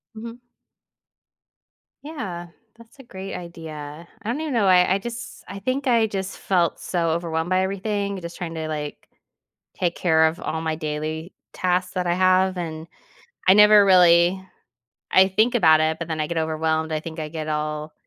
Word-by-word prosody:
Mhm. 230 +2 -8 1.6
Yeah. 195 - -6 0.3
That's 230 +4 -19
a - - -11
great 195 -4 -8
idea. 160 -2 -9
I 220 - -5
don't 265 +6 -2
even 310 -3 -3
know. 225 -4 +2
I 180 0 +5
I - - +1
just 240 +3 -8
I 200 +1 -7
think 260 +6 -2
I 230 -3 +3
just 195 -1 -5
felt 175 -3 0
so 170 -2 -1
overwhelmed 165 0 -2
by 185 0 +2
everything. 200 0 -2
Just 170 0 -8
trying 170 -3 -6
to, 160 -1 -4
like, 150 -2 -6 0.7
take 175 -2 -1
care 160 -2 +3
of 160 +2 -2
all 160 - -3
my 160 -1 -1
daily 155 +2 -4 0.2
tasks 180 0 -1
that 180 -1 -1
I 175 - +1
have. 185 +1 +3
And 160 -2 -5 0.6
I 185 - +7
never 210 0 +7
really 180 0 +5 0.7
I 190 0 +5
think 215 +6 +2
about 160 -9 +5
it, 160 0 0
but 170 0 -6
then 160 -1 -3
I 150 - 0
get 170 - -2
overwhelmed. 160 0 -1
I 155 - -1
think 160 +1 -9
I 155 -1 -4
get 155 0 -6
all 150 0 -3
175 Hz, 180 wpm, -23 LUFS, 160-195 Hz, 1.6 s, I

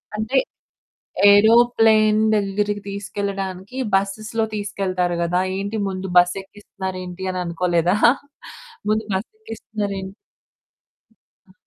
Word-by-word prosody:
అంటే 220 +5 -1 0.9
ఏరోప్లేన్ 220 0 +5 0.2
దగ్గరికి 205 0 -1
తీసుకెళ్లడానికి 195 +1 -5 0.2
బసెస్‌లో 215 +3 0
తీసుకెళ్తారు 185 -3 -2
గాదా! 175 +1 +1 0.2
ఏంటి 200 +3 -3
ముందు 190 0 -4
బస్సెక్కిస్తున్నారేంటి 190 0 -2
అని 185 - -4
అనుకోలేదా? 175 +1 +1 0.9
ముందు 215 +1 +1
బసేక్కిస్తున్నారేంటి? 205 - -5 1.4
అ! - - -20
200 Hz, 75 wpm, -21 LUFS, 185-215 Hz, 1.4 s, ఏరోప్లేన్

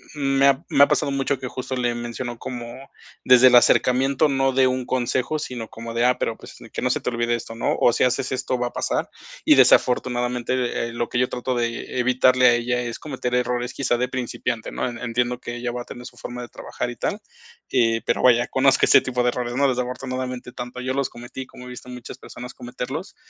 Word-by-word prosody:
me 135 -1 +3
ha 140 +4 +2
me 140 - +5
ha - - +6
pasado 140 - +1
mucho 140 0 0
que 130 - -5
justo 130 +1 -5
le 120 -1 0
menciono 120 0 -5
como 125 +1 -7 0.3
desde 125 0 +7
el 125 - +6
acercamiento 130 +4 +4
no 135 -1 +2
de 130 0 +3
un 130 0 0
consejo, 130 +4 -1
sino 125 -6 -6
como 115 0 -8
de: 115 +1 +1
"Ah, 125 0 +3
pero 115 - -2
pues, - - -13 0.2
que - - -3
no - - +1
se - - +1
te - - -1
olvide 120 0 0
esto", 115 -1 -7
¿no?, 115 - -1
o 120 - +4
si - - +2
haces 125 0 0
esto 130 0 -1
va 125 0 -1
a - - -9
pasar, - - -1 0.4
y - - +7
desafortunadamente, 125 -1 +2
eh, - - -9
lo 120 0 -2
que 120 - -2
yo 125 - +2
trato 125 +1 -3
de 120 -1 +1 0.3
e - - 0
evitarle 125 0 +4
a 120 - +6
ella 125 +1 -1
es 120 -1 -4
cometer 130 -4 -3
errores 125 0 -1
quizá 130 -3 +1
de 125 +1 0
principiante, 120 -3 -3
¿no?, - - -2
en 120 - -7
entiendo 125 0 -1
que 120 - -6
ella 120 0 -3
va 120 0 -5
a - - -26
tener 125 -1 -10
su 120 - -15
forma 120 +1 -7
de 120 - -8
trabajar - - -5
y 120 - -7
tal, 210 - -2 0.5
eh, 115 -3 +2
pero 120 - 0
vaya 120 -1 +5
conozco 135 +1 +3
ese - - +7
tipo 125 -1 -1
de 125 - +3
errores, 120 0 -3
¿no?, 140 +1 +3
desafortunadamente, 125 0 -4
tanto 125 0 -7
yo 130 +1 -2
los 140 -1 0
cometí 120 +2 -8
como 125 - -13
he - - -9
visto 125 0 -10
a - - -7
muchas 125 -1 -9
personas 125 0 -10
cometerlos. 130 +8 -6
125 Hz, 235 wpm, -23 LUFS, 120-130 Hz, 0.5 s, desde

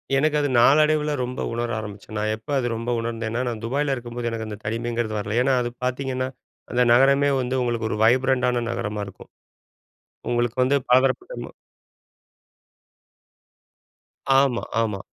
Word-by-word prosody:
எனக்கு 150 +2 +2
அது 145 -1 0
நாளடைவில 150 +3 +4
ரொம்ப 125 +1 -4
உணர 120 0 -2
ஆரமிச்சேன். 105 0 -9
நான் 110 +1 0
எப்ப 110 +7 -18
அது 120 -2 0
ரொம்ப 115 +2 -4
உணர்ந்தேன்னா 115 0 -3
நான் 115 -3 -4
துபாயில் 140 +4 0
இருக்கும்போது 120 -1 -4
எனக்கு 110 -1 -4
அந்த 105 -1 -6
தனிமைங்கிறது 115 0 -2
வரல. 110 +3 -2
ஏன்னா 135 0 +2
அது 120 - -2
பாத்தீங்கன்னா, 130 0 -1 0.4
அந்த 125 0 +3
நகரமே 140 +3 +5
வந்து 125 +1 -2
உங்களுக்கு 120 -2 -1
ஒரு 105 - -2
வைப்ரண்டான 125 0 +3
நகரமா 105 -3 -3
இருக்கும். 95 - -13 1.0
உங்களுக்கு 120 0 0
வந்து 140 +2 +3
பலதரப்பட்ட, 135 - +3
ம - - -9 2.9
ஆமா, 135 -3 +1 0.2
ஆமா. 105 -4 -1
120 Hz, 140 wpm, -23 LUFS, 115-135 Hz, 2.9 s, நகரமே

